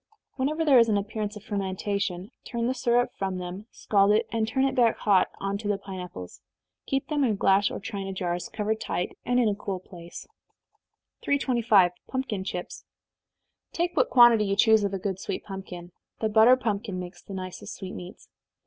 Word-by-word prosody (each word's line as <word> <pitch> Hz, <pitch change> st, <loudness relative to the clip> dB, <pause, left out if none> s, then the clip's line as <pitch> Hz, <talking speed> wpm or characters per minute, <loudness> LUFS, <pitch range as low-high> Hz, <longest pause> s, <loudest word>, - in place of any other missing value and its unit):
Whenever 305 Hz, +5 st, -1 dB
there 275 Hz, -5 st, +7 dB
is 230 Hz, -1 st, +4 dB
any 205 Hz, -1 st, +3 dB
appearance 210 Hz, +1 st, -4 dB
of 210 Hz, -, -10 dB
fermentation, 195 Hz, -1 st, -3 dB
turn 235 Hz, -1 st, -3 dB
the 250 Hz, -, +1 dB
syrup 245 Hz, -1 st, +1 dB
from 190 Hz, -1 st, -2 dB
them, 180 Hz, +4 st, -7 dB
scald 200 Hz, -3 st, +2 dB
it, 220 Hz, +2 st, +3 dB
and 225 Hz, -1 st, 0 dB
turn 265 Hz, +4 st, +1 dB
it 270 Hz, -, 0 dB
back 235 Hz, -3 st, +3 dB
hot 200 Hz, -3 st, +3 dB
on 200 Hz, 0 st, -2 dB
to 210 Hz, -, -5 dB
the 205 Hz, -1 st, +1 dB
pine 195 Hz, -1 st, -8 dB
apples. 90 Hz, -, -9 dB, 0.5 s
Keep 270 Hz, 0 st, -1 dB
them 295 Hz, -2 st, +1 dB
in 225 Hz, -5 st, +2 dB
glass 195 Hz, +1 st, +3 dB
or -, -, -5 dB
china 195 Hz, -1 st, -5 dB
jars, 175 Hz, -2 st, -3 dB
covered 220 Hz, 0 st, -2 dB
tight, 180 Hz, -, -3 dB
and 245 Hz, +1 st, +2 dB
in 240 Hz, -, +3 dB
a 210 Hz, -, +2 dB
cool 200 Hz, -2 st, -4 dB
place. 175 Hz, -2 st, -11 dB, 0.9 s
325. 235 Hz, -9 st, +3 dB, 0.2 s
Pumpkin 260 Hz, -7 st, -3 dB
Chips. 180 Hz, -1 st, -6 dB, 0.9 s
Take 345 Hz, +1 st, -1 dB
what -, -, +3 dB
quantity 240 Hz, -3 st, +6 dB
you 195 Hz, 0 st, 0 dB
choose 220 Hz, 0 st, +5 dB
of 200 Hz, -, 0 dB
a -, -, -1 dB
good 190 Hz, 0 st, -3 dB
sweet -, -, -4 dB
pumpkin, 185 Hz, -3 st, -8 dB, 0.3 s
(the 220 Hz, -, 0 dB
butter 220 Hz, +4 st, +6 dB
pumpkin 210 Hz, -6 st, -3 dB
makes 175 Hz, -1 st, -8 dB
the 195 Hz, -, -9 dB
nicest 185 Hz, -1 st, -7 dB
sweetmeats.) 185 Hz, -1 st, -9 dB
205 Hz, 185 wpm, -26 LUFS, 190-235 Hz, 0.9 s, there